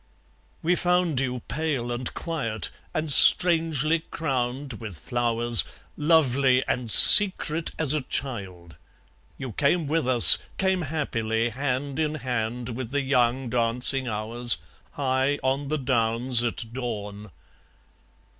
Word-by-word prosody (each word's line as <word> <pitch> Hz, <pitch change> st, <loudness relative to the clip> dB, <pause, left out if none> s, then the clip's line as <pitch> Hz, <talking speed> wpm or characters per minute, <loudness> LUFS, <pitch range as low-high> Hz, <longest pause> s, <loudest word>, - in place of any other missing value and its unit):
(We 175 Hz, +2 st, +1 dB
found 180 Hz, -5 st, -1 dB
you 125 Hz, -2 st, -4 dB
pale 140 Hz, -6 st, -4 dB
and 120 Hz, +1 st, -5 dB
quiet, 115 Hz, -10 st, -5 dB, 0.2 s
and 155 Hz, -2 st, -1 dB
strangely 165 Hz, -2 st, +3 dB
crowned 135 Hz, -4 st, -5 dB
with 105 Hz, -7 st, -8 dB
flowers, 120 Hz, +2 st, +2 dB, 0.3 s
Lovely 140 Hz, -5 st, +1 dB
and 120 Hz, -3 st, -3 dB
secret 170 Hz, -, +7 dB
as 155 Hz, -3 st, 0 dB
a 155 Hz, -, -2 dB
child. 95 Hz, -, -6 dB, 0.6 s
You 130 Hz, -3 st, -8 dB
came 150 Hz, -, -1 dB
with 155 Hz, -1 st, -2 dB
us, 125 Hz, -3 st, +7 dB, 0.2 s
Came 190 Hz, -1 st, -1 dB
happily, 120 Hz, -7 st, -3 dB
hand 135 Hz, +3 st, -5 dB
in 155 Hz, -1 st, -2 dB
hand 125 Hz, -3 st, -5 dB
with 120 Hz, 0 st, -7 dB
the 140 Hz, +2 st, -3 dB
young 130 Hz, -1 st, -1 dB
dancing 125 Hz, +2 st, 0 dB
hours, 115 Hz, +2 st, -2 dB, 0.4 s
High 135 Hz, +1 st, -2 dB
on 135 Hz, +2 st, -2 dB
the 155 Hz, +2 st, -3 dB
downs 120 Hz, -2 st, 0 dB
at 115 Hz, -1 st, -4 dB
dawn!) 105 Hz, -4 st, -7 dB
130 Hz, 120 wpm, -23 LUFS, 120-150 Hz, 0.6 s, secret